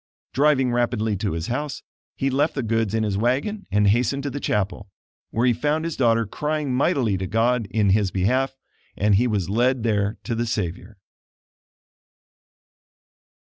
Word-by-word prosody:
Driving 135 -3 +3
rapidly 120 -3 0
to 100 -2 -2
his 80 0 -3
house, 145 +5 -4 0.3
he 135 0 -1
left 145 +4 +1
the 135 - -1
goods 115 -1 0
in 110 - +1
his 100 -2 -1
wagon 140 - -1
and 105 +1 +2
hastened 125 +6 +2
to 140 - -3
the 145 - -4
chapel, 100 -3 -2 0.4
where 115 +2 0
he 125 - +4
found 150 +7 -1
his 165 - -3
daughter 115 -3 +2
crying 150 +4 -2
mightily 125 - +1
to 95 - -3
God 115 +2 +1
in 105 -2 +2
his 100 -1 +2
behalf; 130 +9 0 0.4
and 105 +1 +2
he 115 +6 +3
was 105 -6 -1
led 120 +4 +1
there 105 -2 0
to 120 - -3
the 120 +1 -1
Savior. 105 -1 -4
115 Hz, 165 wpm, -23 LUFS, 105-135 Hz, 0.4 s, he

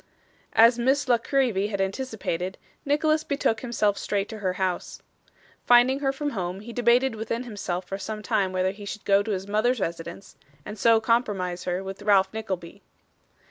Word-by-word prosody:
As 230 +2 +6
Miss 270 +4 +2
La 240 -2 +4
Creevy 230 -7 +1
had 200 -2 -4
anticipated, 195 -4 -3 0.3
Nicholas 310 +2 +2
betook 280 -7 0
himself 215 -5 0
straight 200 -1 -1
to 220 -1 -7
her 185 -3 -1
house. 185 -1 -3 0.6
Finding 245 +3 +5
her 270 -1 +1
from 290 +2 -3
home, 185 -3 -4
he 235 +2 -9
debated 245 +2 +3
within 225 +2 -3
himself 195 -6 -4
for 195 +2 -5
some 215 +1 -5
time 190 -2 +1
whether 185 0 0
he 205 +1 -11
should 205 +1 -7
go 200 0 +4
to 205 - -5
his 195 -1 -2
mother's 220 +4 +1
residence, 170 +1 -5 0.3
and 210 - -8
so 230 +1 +5
compromise 205 -6 0
her 180 +1 -2
with 195 0 -7
Ralph 195 -2 +3
Nickleby. 195 -4 -5
210 Hz, 175 wpm, -25 LUFS, 190-240 Hz, 0.6 s, As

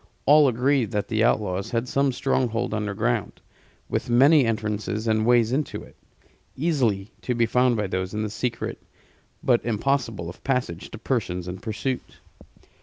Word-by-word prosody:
All 150 0 +7
agreed 125 -1 +2
that 105 -1 -1
the 110 -1 +1
outlaws 95 -3 +1
had 115 +1 -1
some 140 +1 +1
stronghold 125 -3 0
underground, 110 +2 -1 0.5
with - - -2
many 135 +4 +6
entrances 105 0 -2
and 110 0 +2
ways 120 -2 +4
into 140 +2 -2
it; - - -16 0.6
easily 125 - 0
to 125 - -2
be 115 0 +3
found 125 +1 +2
by 105 - 0
those 95 -1 -3
in 105 0 -2
the 110 - -2
secret, 120 +1 -3 0.6
but 120 -3 +3
impossible 115 -5 -1
of 85 - -10
passage 125 -10 -2
to - - -8
persons 95 -7 -2
in 90 +1 -5
pursuit. 125 +4 -4
115 Hz, 155 wpm, -24 LUFS, 105-130 Hz, 0.6 s, All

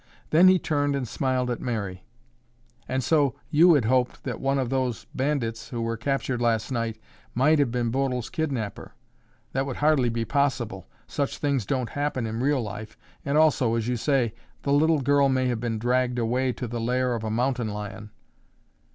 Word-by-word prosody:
Then 170 +4 +7
he 185 0 +7
turned 145 -4 0
and 130 -3 -2
smiled 130 0 -1
at 120 - -3
Mary. 100 -7 -3 0.9
"And 130 0 0
so 145 -3 +2 0.2
you 165 +2 +6
had 130 -6 +2
hoped 125 +1 +1
that 125 - -4
one 135 +1 +1
of 130 -2 -1
those 130 -6 -1
bandits 130 -5 -2
who 120 - -4
were 115 0 -1
captured 130 +1 -2
last 115 +1 +1
night 115 -3 -2 0.4
might 150 +5 +4
have 140 -4 +3
been 120 -1 -1
Bodil's 130 -2 -1
kidnapper. 130 -10 -3 0.6
That 135 +1 0
would 130 - -4
hardly 145 -5 +3
be 115 0 -2
possible. 125 -9 -1 0.2
Such 140 -1 -2
things 140 -8 -1
don't 130 -3 -1
happen 145 -4 -1
in 110 +1 -3
real 135 0 +1
life 105 0 -7 0.3
and, 140 +1 0
also, 135 -7 +3
as 115 -1 -1
you 125 - 0
say, 120 -2 +1 0.3
the 140 - +1
little 155 +1 +3
girl 140 +1 +3
may 130 -1 +1
have 120 -2 -1
been 115 -1 -2
dragged 125 +2 +1
away 125 +3 +1
to 125 - -5
the 120 0 -4
lair 125 +2 +1
of 115 -2 -3
a 110 - -2
mountain 120 +1 0
lion." 105 0 -6
125 Hz, 185 wpm, -26 LUFS, 115-140 Hz, 0.9 s, Then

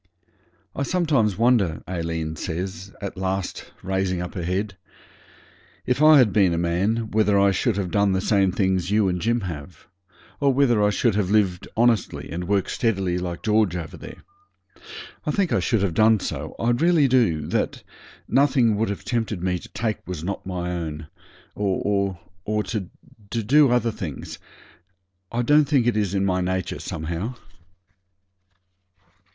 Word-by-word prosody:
'I - - -3
sometimes 140 - +1
wonder,' 115 -8 +2
Aileen 80 -3 -3
says, 95 +3 -5
at 100 -1 -5
last, 95 0 -3
raising 95 -1 -1
up 90 0 -5
her 90 - -4
head, 95 +4 -2 1.1
'if 125 +3 0
I 155 0 +8
had 120 -7 +4
been 95 -5 +4
a - - -2
man 95 +7 0
whether 105 -1 +3
I 100 0 +4
should 105 +3 0
have 95 -3 -2
done 100 -1 +2
the 95 - +1
same 100 -1 +2
things 95 -2 0
you 105 -1 +3
and 90 -1 -1
Jim 115 +1 +1
have, 85 -2 -8 0.5
or 140 -1 +3
whether 125 -5 +3
I 105 - +4
should 110 +2 +1
have 100 -2 0
lived 100 -4 +1
honestly 115 -3 +1
and 85 +1 -4
worked 100 -1 0
steadily 95 -7 0
like 90 -1 -5
George 105 -4 +2
over 85 -3 -6
there. - - -11 1.0
I 155 - -3
think 185 +3 +1
I - - +3
should 115 -5 +1
have 95 -4 0
done 110 +4 +4
so, - - -5
I 115 +1 +1
really 155 +3 +3
do; 110 - +2
that - - -1 0.4
nothing 130 -6 +3
would 110 0 0
have 100 - -5
tempted 110 -6 -2
me 90 -1 0
to - - -13
take 110 -2 -2
what - - -36
was 90 -4 -5
not 100 +3 -4
my 90 -1 -3
own 80 -3 -5 0.4
or 100 -1 -1 0.5
to 105 -6 -4 0.4
to 115 0 -2
do 140 +5 +5
other 120 -1 +2
things. 90 -10 -7 0.9
I 120 +1 0
don't 150 +4 +5
think 140 -4 +2
it 120 - +2
is 100 -2 0
in 95 0 +1
my 90 -1 +1
nature 95 0 -2
somehow.' 85 +10 -4
100 Hz, 165 wpm, -23 LUFS, 90-115 Hz, 1.1 s, I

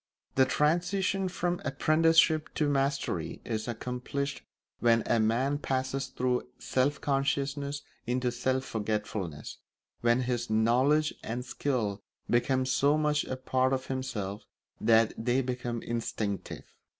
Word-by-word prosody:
The 130 - +5
transition 180 +7 +1
from 175 -1 -2
apprenticeship 155 +2 +3
to 150 - +1
mastery 135 - -1
is 110 -1 -3
accomplished 125 +4 -3 0.4
when 115 -1 +4
a 115 - +2
man 125 +6 +1
passes 135 0 -1
through 125 -1 -1
self 135 +3 0
consciousness 140 +1 -1 0.2
into 125 0 0
self 130 +2 -1
forgetfulness, 105 -8 -3 0.4
when 120 +1 +3
his 120 -2 -2
knowledge 125 +8 +3
and 120 +2 -4
skill 120 -6 -1 0.3
become 130 +2 +2
so 140 +3 +3
much 150 -1 +1
a 130 - -4
part 130 0 +1
of 130 0 -1
himself 120 -7 -3 0.4
that 115 -1 +4
they 125 +2 +2
become 120 -2 -3
instinctive. 110 -3 -3
130 Hz, 120 wpm, -29 LUFS, 120-140 Hz, 0.4 s, The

